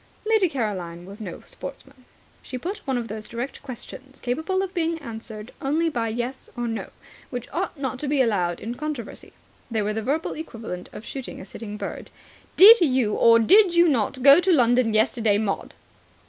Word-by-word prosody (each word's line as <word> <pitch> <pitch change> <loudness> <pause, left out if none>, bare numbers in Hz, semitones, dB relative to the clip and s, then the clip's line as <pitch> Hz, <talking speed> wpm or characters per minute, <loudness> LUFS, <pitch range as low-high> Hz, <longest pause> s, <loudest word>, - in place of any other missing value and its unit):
Lady 430 -4 +3
Caroline 185 - -4
was 200 +4 -11
no 185 -5 -7
sportsman. 270 -2 -10 0.4
She 255 - -6
put 365 - -5
one 265 -2 0
of 235 -1 -3
those 215 0 -5
direct 240 +4 -5
questions, 265 +1 -10
capable 315 +10 -1
of 380 -1 -5
being 335 -2 0
answered 225 -5 -8
only 315 +5 +1
by 235 -6 -2
"Yes" 240 +4 -4
or 240 0 -2
"No", 225 -1 -4 0.4
which 245 -2 -5
ought 345 -4 -3
not 265 -2 -3
to 295 - -3
be 285 0 +1
allowed 190 -9 +1
in 230 - -5
controversy. 285 -3 -6 0.4
They 225 -2 0
are 210 +1 -1
the 220 - -2
verbal 290 +8 -1
equivalent 225 - -7
of 215 - -10
shooting 265 -2 -7
a - - -9
sitting 210 +1 -8
bird. - - -6 0.5
"Did 430 +3 +10
you 255 -9 +2
or 230 0 +6
did 360 - +5
you 345 0 +6
not 255 -2 0
go 280 +3 +9
to 365 +1 +2
London 245 -6 +3
yesterday, 220 -1 +2
Maud?" 205 -2 -3
245 Hz, 185 wpm, -24 LUFS, 220-305 Hz, 0.5 s, Did